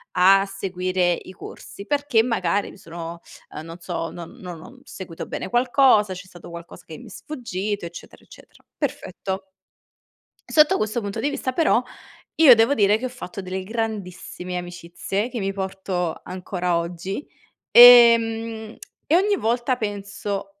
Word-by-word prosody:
a 195 +2 +5
seguire 185 -2 -1
i 180 - -8
corsi 200 +2 -11
perché 285 -3 +2
magari 205 -5 0
mi - - -15
sono" 170 -2 -8 0.3
uhm, 150 - -5
non 165 +1 -9
so 170 -1 -4
"non 170 -2 -9
non 175 -3 -8
ho 250 +8 -14
seguito 185 -10 -8
bene - - -5
qualcosa, 245 -4 +3
c'è 185 +1 -9
stato 175 -2 -13
qualcosa 170 0 -11
che 160 - -9
mi - - -13
è - - -12
sfuggito, 205 - -5
eccetera, 170 0 -11
eccetera." - - -18
Perfetto. 190 0 -4 1.0
Sotto 310 +5 +5
questo 215 +2 -2
punto 200 -1 -5
di 285 - 0
vista 275 -2 -3
però, 315 -5 +3 0.5
io 295 -6 +8
devo 225 +4 +3
dire 205 -4 +3
che 250 - -5
ho - - -3
fatto 225 -6 -8
delle 185 0 -5
grandissime 190 -4 -5
amicizie 175 +4 -4
che 250 - -5
mi 195 -1 -1
porto 190 -3 -4
ancora 180 -1 -2
oggi, 175 - -5 0.4
ehm, 230 -2 +7 0.3
e 315 - +2
ogni 405 +3 +2
volta 240 - 0
penso: 200 -2 -5
195 Hz, 150 wpm, -23 LUFS, 180-235 Hz, 1.0 s, io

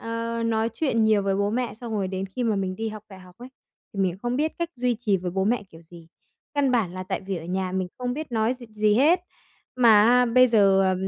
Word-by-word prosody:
ờ, 230 0 -3
nói 225 0 0
chuyện 230 -6 +1
nhiều 215 -2 +3
với 195 0 0
bố 200 +1 0
mẹ, 245 +2 -2
xong 230 0 -8
rồi 200 -3 -1
đến 190 +1 -4
khi 245 +6 -5
mà 220 -3 +1
mình 185 -1 -3
đi 225 0 -3
học 215 -1 -8
đại 190 -2 -12
học 180 -1 -16
ấy, 245 - -10 0.4
thì 195 - -4
mình 185 -1 0
không 240 +1 -1
biết 310 +3 0
cách 340 0 -2
duy 250 0 0
trì 215 -3 0
với 180 -1 -4
bố 190 +2 -1
mẹ 225 +1 +1
kiểu 165 0 -15
gì. 170 -2 -14 0.5
Căn 285 -2 +2
bản 220 -8 0
là 185 - -5
tại 185 - -4
vì 195 0 -4
ở 165 - -7
nhà 185 +1 -3
mình 185 -1 -2
không 250 -1 -2
biết 305 -2 -7
nói 225 +2 +1
gì 250 -1 -13
gì 210 -1 +1
hết, 315 +10 +4 0.6
mà 225 -4 +6
á, 250 +1 +4
bây 255 +2 +5
giờ, 200 -4 +4
à, 190 -1 +2
220 Hz, 265 wpm, -24 LUFS, 190-245 Hz, 0.6 s, mà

